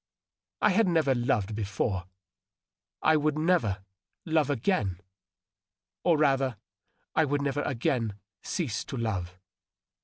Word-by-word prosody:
I 210 - +6
had 210 +2 +3
never 160 -6 +3
loved 120 -4 0
before; 100 -2 -2 1.0
I 155 - +5
would 155 0 +1
never 125 - +1 0.4
love 160 -4 +2
again 110 - 0 0.6
— 95 0 -65
or, 170 -3 +4
rather, 135 -5 +2 0.6
I 160 - +4
would 145 -1 0
never 140 +1 0
again 115 -5 -1 0.3
cease 145 - -2
to 135 - -5
love. 95 -6 -2
130 Hz, 120 wpm, -28 LUFS, 100-155 Hz, 1.0 s, I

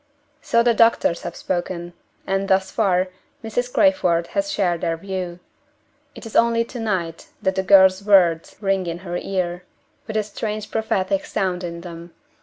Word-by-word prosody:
So 235 0 +2
the 240 0 +4
doctors 230 -6 +3
have 175 -1 -6
spoken; 175 -1 -4 0.3
and, 195 0 -1
thus 190 -1 +2
far, 185 -4 +1 0.3
Mrs. 245 +3 -2
Crayford 180 - +3
has 300 0 0
shared 180 - 0
their 165 -2 -1
view. 185 -1 -5 0.8
It - - -10
is 225 - -9
only 230 0 +3
to 245 - -8
night 185 -7 -3
that 190 - 0
the 190 - 0
girl's 190 0 +5
words 180 -5 +3
ring 195 -3 0
in 170 0 -3
her 175 0 -3
ear, 180 -2 -3 0.4
with 220 -1 -2
a 215 - +1
strange 210 +1 -5
prophetic 200 -3 0
sound 180 -1 -1
in 170 -1 -5
them. 170 -1 -10
190 Hz, 165 wpm, -22 LUFS, 175-215 Hz, 0.8 s, girl's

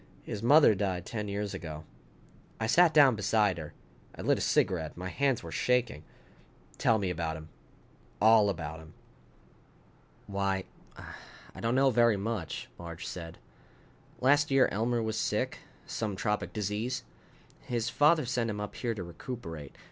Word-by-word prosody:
His 105 - -5
mother 140 0 +6
died 95 -3 -2
ten 105 -2 -4
years 100 0 -3
ago." 80 -2 -7 0.8
I 110 - -1
sat 170 +8 +5
down 140 -6 +6
beside 105 -3 +1
her. 75 -2 -8 0.4
I - - -7
lit - - +2
a - - -4
cigarette. 80 -4 +1
My 90 +1 -5
hands 135 0 0
were 85 - -8
shaking. 125 -9 0 0.8
"Tell 115 - +4
me 95 -3 -1
about 80 -2 -3
him. 80 0 -11 0.7
All 110 -1 +6
about 80 -4 -4
him." 80 -1 -14 1.3
"Why, 100 -1 -1 0.3
I - - -13
don't 115 +2 0
know 135 0 +4
very 120 -2 +4
much," 100 -5 -4
Marge 85 -1 -7
said. 85 -2 -7 0.8
"Last 145 +3 +4
year 135 -2 +5
Elmer 115 +3 0
was 110 0 -2
sick, - - -1 0.3
some 105 -3 -3
tropic 105 +3 -1
disease. 105 +5 -2 0.6
His 120 -1 -2
father 155 0 +4
sent 120 -1 -1
him 105 -1 -3
up 105 0 -5
here 115 -2 -2
to 95 - -5
recuperate. 85 - -8
105 Hz, 150 wpm, -30 LUFS, 90-120 Hz, 1.3 s, mother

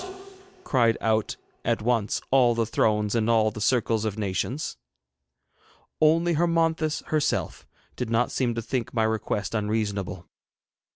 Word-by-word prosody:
cried 115 -4 +2
out 110 -1 0 0.3
at - - 0
once 115 -3 0
all 125 -3 +4
the 115 -1 +1
Thrones 105 -1 +1
and 115 -1 +1
all 110 -2 +3
the 105 - -8
Circles 115 -1 +1
of 110 -1 -2
Nations. 105 +8 -2 1.3
Only 165 +2 +4
Hermonthis 165 -1 +1
herself 155 -2 -1 0.3
did 125 -3 -4
not 115 +2 +1
seem 120 -3 0
to 115 - -3
think 125 0 -3
my 110 - +2
request 110 -1 -1
unreasonable. 105 -5 -2
115 Hz, 130 wpm, -26 LUFS, 110-130 Hz, 1.3 s, all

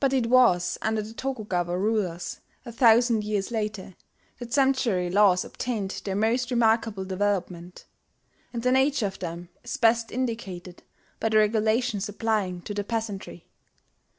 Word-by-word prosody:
But 270 -1 +2
it 245 -3 +1
was 185 -9 +4
under 220 -1 0
the 220 +2 -9
Tokugawa 205 -10 -2
rulers, 190 -4 -1 0.3
a 235 - -7
thousand 230 -1 +4
years 210 0 -2
later, 210 -4 -3 0.5
that 240 -1 -8
sumptuary 260 -10 +2
laws 190 -2 +4
obtained 210 -6 -4
their 195 -1 -3
most 235 +4 +1
remarkable 225 -4 +1
development; 185 -2 -3 0.7
and 235 -2 -5
the 250 - +2
nature 265 -2 +2
of 195 -1 -5
them 170 0 -6
is - - -4
best: 230 -3 +2
indicated 210 -8 -4 0.4
by 225 - 0
the 215 - +3
regulations 215 0 +1
applying 205 -4 -1
to 205 - -5
the 205 0 -2
peasantry. 205 - -5
215 Hz, 145 wpm, -26 LUFS, 190-235 Hz, 0.7 s, was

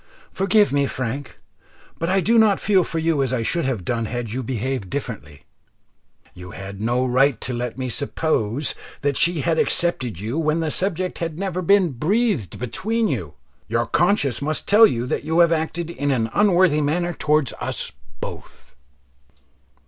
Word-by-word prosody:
Forgive 195 -1 +3
me, 140 -1 +2
Frank, 130 +2 -4 0.6
but 165 - -1
I 190 +1 +3
do 230 +4 +4
not 215 -3 +4
feel 195 -3 +3
for 165 - -4
you 160 -3 +1
as 130 -2 0
I 125 -3 0
should 170 +7 -1
have 120 -10 -2
done 115 +2 -1
had 115 0 -4
you 130 +3 -2
behaved 130 -3 -3
differently. 95 - -6 0.9
You 90 0 -10
had 95 +1 -8
no 120 +3 +1
right 130 -1 +3
to 130 - -3
let 120 0 -4
me 130 -1 -3
suppose 140 -1 -1 0.3
that 145 -1 0
she 170 0 +1
had 160 +2 +1
accepted 130 - +1
you 115 +10 -3
when 155 0 +1
the 160 -2 -1
subject 185 0 -2
had 165 -2 -3
never 185 -1 -2
been 185 -1 +4
breathed 170 - 0
between 215 - -1
you. 100 - -4 0.3
Your 115 +1 0
conscience 155 - +1
must 155 +2 -3
tell 220 +2 +7
you 120 - -2
that 125 - -2
you 160 +2 -1
have 170 -1 +5
acted 165 +1 -2
in 145 -3 -2
an 115 -5 0
unworthy 185 -6 +4
manner 175 +4 0
towards 150 -6 +1
us - - -2 0.3
both." - - -9
145 Hz, 170 wpm, -22 LUFS, 120-175 Hz, 0.9 s, tell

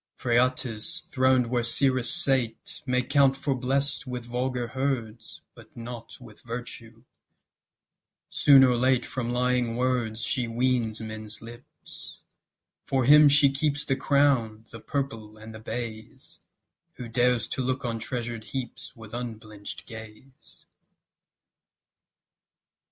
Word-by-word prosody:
Phraates, 120 -2 0
throned 130 -1 +2
where 120 -1 +1
Cyrus 125 +1 +3
sate, 135 -9 +2
May 125 0 +1
count 135 0 +3
for 135 0 -1
blest 135 +2 -1
with 125 -2 -5
vulgar 125 0 -2
herds, 120 -3 -4
But 115 0 -17
not 115 0 -8
with 115 -4 -14
Virtue; 115 -1 -8 1.2
soon 140 -2 +6
or 125 -2 +4
late 130 0 +2
From 120 -2 -3
lying 125 -1 0
words 120 -3 -1
She 125 -3 0
weans 115 -2 0
men's 110 -1 -7
lips; 120 +2 -12 0.6
for 130 -2 0
him 150 +2 +8
she 140 -1 +6
keeps 145 +1 0
The 135 - +1
crown, 130 -6 +1
the 115 - -9
purple, 115 -5 -4
and 110 +1 -11
the 110 - -9
bays, 110 -1 -7 0.5
Who 125 - -8
dares 120 0 +1
to - - -2
look 130 0 -2
on 115 -1 -2
treasure 120 0 -4
heaps 120 +3 -7
With 110 -2 -13
unblench'd 110 -4 -7
gaze. 110 +4 -12
125 Hz, 125 wpm, -26 LUFS, 115-130 Hz, 1.2 s, him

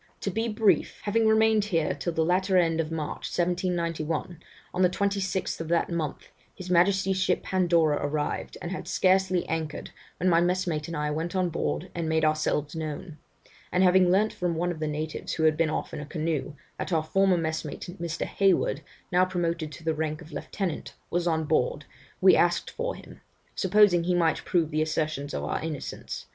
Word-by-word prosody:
'To 200 - -2
be 225 +5 -1
brief 215 -1 +2
having 220 +2 +2
remained 220 -1 +4
here 165 -7 0
till 150 +5 -3
the 160 -1 +1
latter 185 +2 +2
end 165 -2 +2
of 160 0 -5
March, 155 -2 -4
1791, 170 -2 -1 0.3
on 180 - -1
the 180 - +5
26th 195 -1 -1
of 165 - -5
that 170 +1 +1
month, 160 -4 -3 0.3
his 185 -1 -7
Majesty's 190 +2 +3
ship - - +1
Pandora 170 -5 +2
arrived, 145 +1 -2
and 175 - -4
had 190 - -5
scarcely 185 -1 +2
anchored, 160 -2 -4 0.3
when 180 - 0
my 170 -2 +5
messmate 175 -4 0
and 165 -1 -4
I 150 0 -1
went 165 +5 -3
on 185 -1 +1
board 75 - -2
and 165 -2 -2
made 160 0 +2
ourselves 155 -1 0
known; 155 +1 -5 0.5
and 180 - +3
having 185 0 +5
learnt 210 +4 +3
from 175 -2 -1
one 175 +2 0
of 165 - -6
the 155 - -1
natives 150 +1 -4
who 160 - -1
had 155 -1 +4
been 165 0 +1
off 155 - -3
in - - -4
a 150 - -6
canoe, 155 -2 -2 0.2
that - - -4
our 160 -2 +2
former 195 +3 +3
messmate 160 -2 -3 0.2
Mr. 170 -1 -2
Hayward, 190 -6 +2 0.3
now 180 +1 +4
promoted 170 -4 -1
to 150 - -11
the 160 0 +1
rank 155 0 -2
of 160 - -15
lieutenant, 175 +3 -4 0.2
was 175 0 0
on 160 -1 +1
board, - - 0 0.3
we - - +7
asked - - +2
for - - -3
him, - - -13 0.3
supposing 190 -3 +4
he 180 0 +2
might 165 -2 +1
prove 170 -4 +1
the 155 +1 +1
assertions 155 -2 -1
of - - -3
our - - -2
innocence. 155 -4 -5
170 Hz, 190 wpm, -27 LUFS, 155-185 Hz, 0.5 s, we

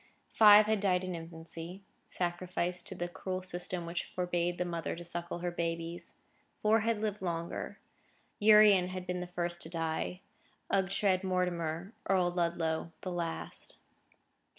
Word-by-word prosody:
Five 210 -1 +8
had 215 0 +1
died 185 -2 +2
in 185 0 -3
infancy,—sacrificed 175 +1 -4
to 190 - -4
the 175 0 -2
cruel 185 +1 -4
system 180 -1 -2
which 170 +1 -3
forbade 175 -1 0
the 180 - -1
mother 170 -3 -3
to 175 +1 -9
suckle 170 0 -2
her 175 - 0
babies. 170 0 -3 0.5
Four 215 +1 +5
had 225 -1 0
lived 210 -2 -2
longer; 170 -2 -3 0.6
Urian 210 -3 +7
had 185 0 -5
been 180 0 -2
the 180 - -4
first 175 -1 -3
to 160 - -3
die, 165 +2 -2 0.5
Ughtred 190 -1 +2
Mortimar, 180 -1 -1 0.2
Earl 185 -2 +3
Ludlow, 170 -2 -1
the 185 - -4
last. 170 -2 -4
180 Hz, 140 wpm, -32 LUFS, 170-185 Hz, 0.6 s, Five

